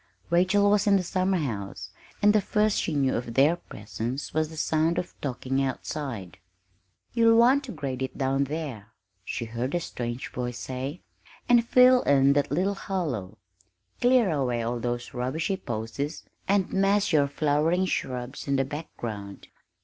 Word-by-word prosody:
Rachel 190 +4 +4
was 210 0 +2
in 200 - +6
the 190 - +2
summerhouse, 135 - -2 0.3
and 210 0 +6
the 215 - +4
first 210 +1 +1
she 160 - -2
knew 135 -2 +2
of 115 -1 -4
their 145 +5 +5
presence 120 - -6
was 155 0 0
the 160 - -10
sound 160 +2 +1
of 175 - -3
talking 135 0 -2
outside. 130 - -4 0.7
"You'll 230 -1 +5
want 260 +4 +5
to 250 - -7
grade 135 - -4
it 130 - -4
down 135 0 +1
there," 140 -8 -6 0.3
she 115 - -4
heard 120 +6 -3
a - - +2
strange 120 -5 -5
voice 125 -1 -4
say, 130 +7 -5 0.5
"and 240 -1 +5
fill 250 +1 +6
in 140 0 +4
that 145 0 +1
little 185 +7 +1
hollow; 140 - -4 0.6
clear 245 -5 +4
away 125 -6 0
all 120 +1 -2
those 120 0 -3
rubbishy 140 +10 -1
posies, 120 +5 -4 0.2
and 195 -2 +1
mass 195 0 +2
your 145 -2 +4
flowering 155 +5 +1
shrubs 130 -6 -3
in 140 - +1
the 135 0 +1
background. 115 -9 -7
145 Hz, 155 wpm, -27 LUFS, 125-185 Hz, 0.7 s, in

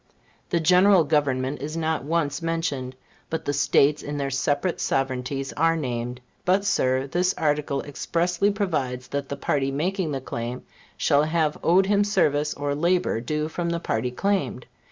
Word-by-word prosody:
The 170 - +1
General 180 +2 +5
Government 140 -2 0
is 155 +3 -4
not 160 -4 -1
once 150 0 -1
mentioned; 165 -6 -2 0.3
but 160 - -3
the 145 - 0
States 145 +1 +3
in 145 0 -5
their 140 -1 -2
separate 145 +6 0
sovereignties 135 0 -1
are 165 +2 +2
named. 125 -3 -3 0.2
But, 190 +2 +2
Sir, 130 -7 +1
this 180 +6 0
article 150 -3 0
expressly 170 +6 0
provides 145 - -2
that 140 -1 -3
the 140 - -4
party 135 -1 0
making 170 +4 -1
the 135 - -2
claim 120 -1 -5 0.3
shall 145 0 +3
have 155 -1 0
owed 185 +3 +4
him 205 +1 +3
service, 150 -8 +1
or 145 0 -2
labor 170 -4 +1
due 150 +5 -2
from 170 +2 -3
the 170 0 -1
party 125 -6 -1
claimed. 190 -2 -1
150 Hz, 160 wpm, -25 LUFS, 135-170 Hz, 0.3 s, General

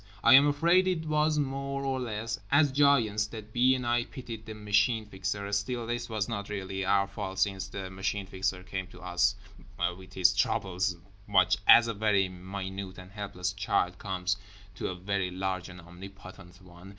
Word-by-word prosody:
I 115 - +7
am 140 +2 +8
afraid 170 +6 +3
it 170 -4 -1
was 155 0 +2
more 140 -1 -2
or 135 -1 -1
less 115 -2 -3
as 145 0 +5
giants 125 -7 +3
that 110 -1 -10
B. 125 +2 +4
and 125 -1 -4
I 120 0 +1
pitied 115 -5 -9
the 110 - -6
Machine 105 +2 +1
Fixer—still 100 +4 -3
this 120 +1 -3
was 110 -2 -1
not 100 -4 -4
really 95 -1 -4
our 100 +1 +3
fault, 95 -1 -6
since 95 -2 0
the 95 -2 -6
Machine 95 +1 -2
Fixer 95 -1 -2
came 95 0 -5
to - - -14
us 90 +3 +1 0.6
with 95 0 -14
his 90 -2 +4
troubles 95 -2 0 0.3
much 95 -3 +3
as 120 0 +9
a 115 - -1
very 100 -2 +2
minute 95 +1 -6
and 90 0 -11
helpless 95 -3 -4
child 95 -2 0
comes 95 -1 -2 0.4
to 95 - -4
a 95 - -4
very 95 0 -2
large 95 0 -3
and 90 0 -11
omnipotent 90 0 -12
one. 90 +1 -14
100 Hz, 175 wpm, -29 LUFS, 95-120 Hz, 0.6 s, as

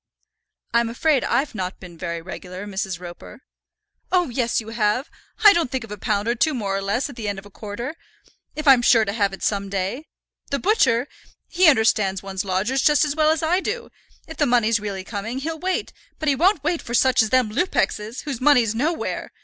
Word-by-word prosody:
"I'm 235 0 +2
afraid 275 +3 +1
I've 285 +2 0
not 185 -3 -4
been 180 -2 -11
very 170 -1 -5
regular, 185 +1 -8
Mrs. 190 -3 -4
Roper." 180 +6 -11 0.7
"Oh, 355 -5 +2
yes, 235 -1 0
you 220 -1 -7
have. 225 +4 0 0.3
I 415 -1 +10
don't 335 -7 0
think 260 -2 -3
of 225 - -11
a 210 - -5
pound 205 +1 -1
or 235 - +2
two 290 +5 +1
more 200 -5 -2
or 195 - -1
less 200 +7 -1
at 280 - -11
the 225 -3 -5
end 200 -1 -2
of 195 - -9
a 205 - -14
quarter, 230 - -6 0.6
if 305 0 -5
I'm 265 -3 +7
sure 230 -2 +5
to 200 - -3
have 200 -3 +1
it 195 - -9
some 200 -1 -1
day. 200 +10 -3 0.4
The 280 - 0
butcher, 275 - +2 0.4
he 355 -2 +5
understands 215 -7 +2
one's 190 -1 -4
lodgers 205 +8 0
just 300 +1 +4
as 290 -1 -2
well 310 -1 +3
as 320 +1 +1
I 345 +4 +2
do, 470 +5 -4 0.4
if 320 - -9
the - - +2
money's 230 -2 +3
really 200 -2 -5
coming, 220 +5 -5
he'll 320 +4 -4
wait; 370 +2 -2 0.2
but 310 - -4
he 285 - +4
won't 350 +2 +2
wait 335 +2 0
for 240 - -4
such 260 0 +4
as 220 - 0
them 250 -2 +2
Lupexes, 225 - -1
whose 275 -5 -5
money's 250 -6 +4
nowhere. 310 +8 -2
235 Hz, 215 wpm, -22 LUFS, 200-295 Hz, 0.7 s, I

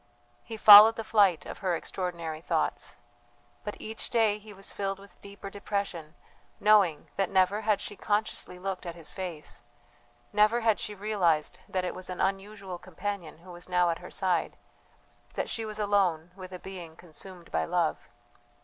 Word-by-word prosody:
He 225 - -7
followed 215 +1 +10
the 225 - -4
flight 200 -6 +3
of - - -8
her 185 -3 0
extraordinary 170 -3 -4
thoughts; - - -2 0.7
but 210 - -6
each 220 +1 -6
day 220 -3 +2
he 215 0 -13
was 195 -1 -5
filled 195 -1 -2
with 200 +1 -17
deeper 200 0 -9
depression, 200 -6 -4 0.4
knowing 200 -8 +4
that 195 -2 +1
never 190 +2 +2
had 210 -2 +2
she 205 - -5
consciously 205 -3 -2
looked 185 0 -4
at 170 - -5
his 165 -3 -8
face, 175 -5 -5 0.7
never 215 +3 +4
had 225 -2 +2
she 210 - -4
realized 190 -7 0
that 185 -1 -1
it - - -3
was 185 - -9
an 180 - -5
unusual 195 -1 -3
companion 185 -2 -5
who 185 - -11
was 175 +1 -10
now 180 -1 +3
at 165 - -4
her 180 - -10
side, 185 -2 -1 0.8
that - - -2
she 225 - -3
was 215 -1 -6
alone 190 -6 +1
with 185 -1 -10
a 180 - -6
being 180 -4 -9
consumed 175 +2 -11
by 80 - +1
love. - - -1
195 Hz, 170 wpm, -29 LUFS, 175-205 Hz, 0.8 s, followed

